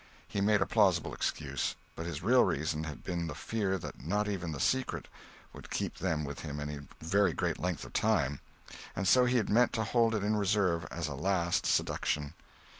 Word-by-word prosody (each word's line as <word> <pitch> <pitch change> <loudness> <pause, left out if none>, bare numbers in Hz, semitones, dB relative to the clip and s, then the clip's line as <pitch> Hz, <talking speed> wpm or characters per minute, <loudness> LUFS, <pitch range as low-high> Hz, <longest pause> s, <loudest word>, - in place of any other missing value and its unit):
He 100 - -2
made 105 0 +4
a - - -4
plausible 95 -6 +3
excuse; - - -2 0.2
but 80 - -5
his 80 -2 -5
real 125 +5 +6
reason 75 +1 -1
had 75 -3 -7
been 85 -2 -2
the 75 - -5
fear 100 -4 -1
that 80 - -8
not 105 +7 0
even 90 -5 -2
the 75 - -5
secret 130 - 0 0.5
would - - -11
keep - - -3
them 75 -1 0
with 70 0 -6
him 75 -2 -5
any 75 0 -4 0.2
very 95 +2 +3
great - - -1
length 90 0 -2
of - - -12
time, 70 +2 +1 0.6
and 95 +1 -1
so 125 +3 +6
he 125 +1 +3
had 110 - +1
meant 120 +3 +4
to 110 - 0
hold 115 +1 +2
it 105 - -1
in 105 +1 +1
reserve 95 -6 +1
as 85 -2 -3
a 70 - -4
last 85 +3 +1
seduction. 75 0 0
90 Hz, 200 wpm, -31 LUFS, 80-105 Hz, 0.6 s, real